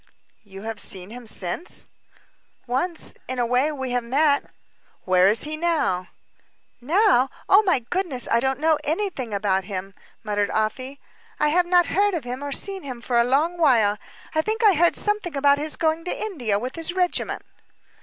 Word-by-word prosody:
"You 195 -1 -11
have 225 -1 -5
seen 190 0 -7
him 245 0 -10
since?" 205 - -3 0.8
"Once 310 +8 -1
in 255 - -4
a 245 - +1
way 250 +5 +1
we 265 -4 -4
have 245 -1 0
met." 280 +4 +2 0.6
"Where 185 0 +4
is 215 +3 +3
he 305 +1 -3
now?" 310 - 0 0.7
"Now! 310 - +3 0.2
Oh, 395 - +7
my 380 -7 +2
goodness, 345 -10 -2
I 230 - +3
don't 265 +2 -1
know 315 0 +2
anything 315 - -2
about 195 -2 0
him 195 -1 -6
now," - - -29 0.2
muttered 205 -2 -1
Afy. 255 +6 -2 0.4
"I 300 - +3
have 350 +3 +2
not 355 -1 +4
heard 400 +2 +1
of 325 - -3
him 250 +3 -6
or 285 - -4
seen 390 +6 +2
him 255 -5 -7
for 235 0 0
a - - +5
long 300 +8 +1
while. 225 -9 +3 0.3
I 315 - +2
think 440 +6 -2
I 420 -3 +7
heard 345 +1 +3
something 415 -7 +1
about 280 0 +4
his 300 +1 +1
going 320 0 0
to - - -2
India 250 - -1
with 250 +8 -5
his 330 +1 -1
regiment." 360 -1 -1
275 Hz, 185 wpm, -23 LUFS, 230-340 Hz, 0.8 s, Oh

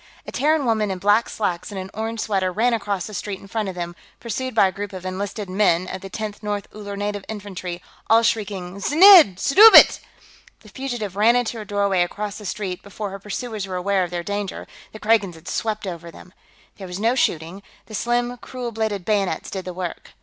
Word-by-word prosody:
A - - -7
Terran 300 0 +1
woman, 220 -3 +1
in 190 - -3
black 205 +5 +2
slacks 180 -3 -3
and 195 - -5
an 190 +1 -7
orange 225 +1 -3
sweater, 190 -4 0
ran 235 +6 +1
across 205 -4 -2
the 215 - -9
street 200 -1 -4
in - - -14
front 215 -1 -2
of 185 - -7
them, 175 -1 -5 0.2
pursued 250 +2 -4
by 200 - +5
a - - -3
group 200 +1 -6
of 185 -1 -8
enlisted 200 +2 -4
"men" 185 -2 +2
of 190 - -6
the 195 - -8
Tenth 210 +1 -6
North 205 -2 -3
Uller 205 -1 -7
Native 205 0 -3
Infantry, 190 -4 -6 0.3
all 225 +1 +6
shrieking 200 -5 -2
"Znidd 330 - +8
suddabit!" 425 +10 +8 0.6
The 215 - -16
fugitive 240 -5 -5
ran 220 +4 +4
into 240 -2 -1
a - - -8
doorway 200 -2 +1
across 205 +4 -3
the 210 - -7
street; 190 -1 -4
before 200 0 -6
her 195 - -7
pursuers 210 0 -5
were 185 - -5
aware 190 +1 +1
of 175 - -4
their 175 0 -4
danger, 205 0 -4 0.3
the - - -9
Kragans 210 -5 +1
had 160 - -15
swept 215 -2 -2
over 170 -2 -6
them. 180 +2 -14 0.4
There 190 - -8
was 180 +1 -6
no 230 +3 +2
shooting; 170 -6 -1 0.2
the 220 - -13
slim, 240 +3 -1
cruel 245 -1 -6
bladed 215 -4 -2
bayonets 200 -6 -1
did 190 -2 -5
the 185 - -4
work. 180 -2 -6
205 Hz, 210 wpm, -22 LUFS, 185-220 Hz, 0.6 s, Znidd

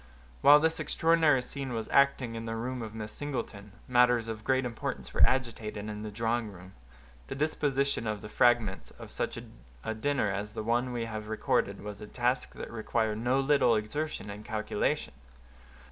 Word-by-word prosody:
While 145 +1 +9
this 160 +1 +1
extraordinary 160 -5 +3
scene 135 -1 -5
was 115 -1 -3
acting 140 -4 +3
in 115 0 -5
the 115 0 -3
room 125 +2 -3
of 110 -1 -7
Miss 105 -1 -5
Singleton, 105 -8 -5
matters 125 -2 +4
of 110 -1 -5
great 130 +1 +2
importance 115 -2 -4
were - - 0
agitated 110 -5 -2
in 105 -1 -5
the 110 - -5
drawing 115 +1 -1
room. 95 0 -13 0.5
The - - -5
disposition 140 -4 0
of 105 -1 -2
the - - -6
fragments 115 -3 +2
of - - -12
such - - -2 0.5
a 110 - -2
dinner 120 -2 0
as 105 +1 -4
the 110 -1 -4
one 120 +3 +1
we 120 -2 -2
have 110 -1 -6
recorded 110 -2 0
was 105 -1 -7
a 105 - -7
task 125 +3 -1
that - - -7
required 110 -1 -1
no 125 +3 +2
little 135 -4 +4
exertion 110 +1 -3
and 105 +1 -8
calculation. 110 -2 -1
115 Hz, 175 wpm, -30 LUFS, 105-130 Hz, 0.5 s, While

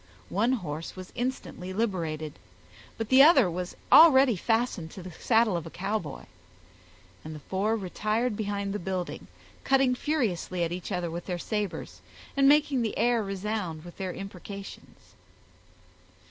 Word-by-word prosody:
One 225 +7 +2
horse 165 - -4
was 185 -1 -9
instantly 245 -7 -4
liberated, 165 -8 -2 0.6
but 225 -1 -4
the 260 +1 +7
other 275 - +7
was 180 +1 -5 0.2
already 270 -7 +8
fastened 225 -4 0
to 185 - -9
the 185 - -8
saddle 225 +3 +2
of 170 -2 -3
a - - -7
Cowboy, 190 -5 -4 1.0
and 155 0 -7
the - - -8
four 195 +8 0
retired 215 +4 -1
behind 200 -1 -2
the 205 - -2
building, 185 0 -4 0.4
cutting 270 -1 +3
furiously 225 - -1
at 165 - -1
each 180 +3 -5
other 180 -3 -2
with 170 +1 -6
their 180 -2 -2
sabers, 175 - -4 0.3
and 275 0 +5
making 290 -3 +4
the 225 -2 -2
air 240 -1 +2
resound 195 -4 -4
with 175 - -11
their 190 -1 -3
imprecations. 195 +1 -10
200 Hz, 145 wpm, -28 LUFS, 175-235 Hz, 1.0 s, already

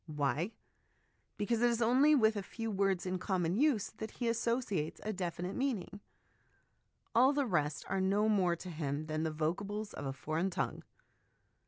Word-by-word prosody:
Why? 150 - 0 0.9
Because 220 +2 0
it 240 - +5
is 235 -1 0
only 260 +6 +5
with 220 -4 +4
a 205 - -1
few 225 +3 -5
words 195 -2 +1
in 185 0 -2
common 180 -2 0
use 260 -4 +2
that 220 0 -6
he 240 - -1
associates 230 -8 -1
a 215 - -2
definite 180 0 -3
meaning; 240 -7 -2 1.1
all 260 +4 +6
the 285 -1 +1
rest 150 - 0
are 190 0 0
no 200 +3 +2
more 190 -5 +3
to 180 +1 -8
him 150 -2 -3
than 155 0 -2
the 160 - 0
vocables 200 +7 -2
of 145 - -5
a - - -1
foreign 155 +6 -1
tongue. 185 - -2
195 Hz, 170 wpm, -34 LUFS, 165-225 Hz, 1.1 s, all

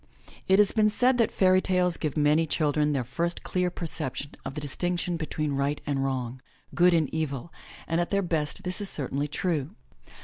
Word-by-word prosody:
It 190 - +5
has 205 -1 +5
been 215 -1 +3
said 250 +4 +2
that 230 - +4
fairy 185 -1 +3
tales 180 -2 +3
give 155 -2 -3
many 150 +2 +3
children 150 -1 +1
their 135 -3 0
first 170 +8 -2
clear 180 -1 0
perception 150 -5 -4
of 135 - -6
the - - -2
distinction 175 +4 -1
between 155 -2 -2
right 140 +2 0
and 140 -2 -1
wrong, 130 -2 -3 0.3
good 175 0 +5
and 160 -3 +2
evil, 155 -1 -3 0.3
and 165 +1 +1
at 175 - -2
their 200 0 +1
best 160 -4 -1
this 185 +3 -2
is 200 - -1
certainly 140 +1 -1
true. 155 +1 -2
160 Hz, 190 wpm, -27 LUFS, 145-180 Hz, 0.3 s, It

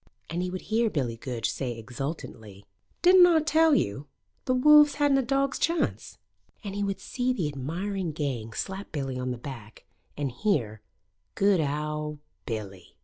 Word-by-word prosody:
And 170 +1 -1
he 180 - -2
would 185 0 -6
hear 225 +1 +1
Billy 130 - -2
Goodge 115 -1 -3
say 125 -4 -4
exultantly: 115 - -7 0.4
"Didn't 360 0 +8
Aw 335 -2 +5
tell 320 0 +4
yo' 135 - -1 0.4
the 255 - +1
Wolves 295 +2 +7
hadn't 285 -2 +3
a - - +3
dog's 275 +1 0
chance?" 335 +1 -1 0.5
And 200 -2 -5
he 205 0 -2
would 195 -1 -2
see 255 0 -1
the 185 -11 -1
admiring 170 +7 -3
gang 135 -7 -3
slap 195 - -5
Billy 135 -4 -3
on 125 0 -2
the 125 - -3
back, 115 -4 -10 0.3
and 145 -3 -2
hear 120 - -1 0.5
"Good 200 -2 +3
owd 150 +1 -3 0.3
Billy!" 100 -6 -6
155 Hz, 160 wpm, -27 LUFS, -, 0.5 s, Didn't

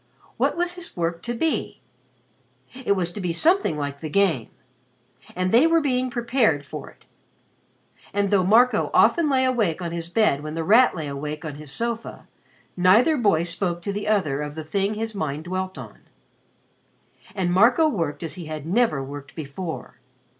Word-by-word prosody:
What - - +1
was 350 0 +1
his 355 - -7
work 170 0 -2
to 240 +4 -4
be? 320 +7 -2 0.9
It 255 -5 0
was 175 -3 -1
to 205 - -6
be 180 -2 -1
something 320 - +2
like 145 -1 -4
"the 155 - -6
game." 165 - +1 0.9
And 185 +1 -1
they 245 +8 +6
were 330 0 +4
being 255 -4 0
prepared 235 - +1
for - - -8
it. - - -22 1.1
And 200 0 0
though 195 -2 +4
Marco 230 +7 +4
often 335 -3 +4
lay 260 -2 +2
awake 220 -10 +1
on 170 -2 -4
his 170 0 -5
bed 175 -7 +2
when 155 +1 -6
The 165 - -2
Rat 225 +7 +5
lay 160 -4 -4
awake 150 +3 -5
on 155 - -5
his 150 -2 -7
sofa, 230 +5 -4 0.5
neither 200 - +4
boy 205 - +2
spoke 175 0 -2
to 200 - -3
the 205 +1 -4
other 155 -10 +1
of 150 0 -5
the 160 - -5
thing 195 +6 -1
his 225 +1 -3
mind 155 -5 -3
dwelt 185 +2 -4
on. - - -10 1.4
And 180 -3 0
Marco 240 - +5
worked 170 - -2
as 165 - -3
he 175 -3 -7
had 155 -2 -6
never 185 - +1
worked 140 +1 -9
before. 160 +3 -7
185 Hz, 175 wpm, -23 LUFS, 160-235 Hz, 1.4 s, they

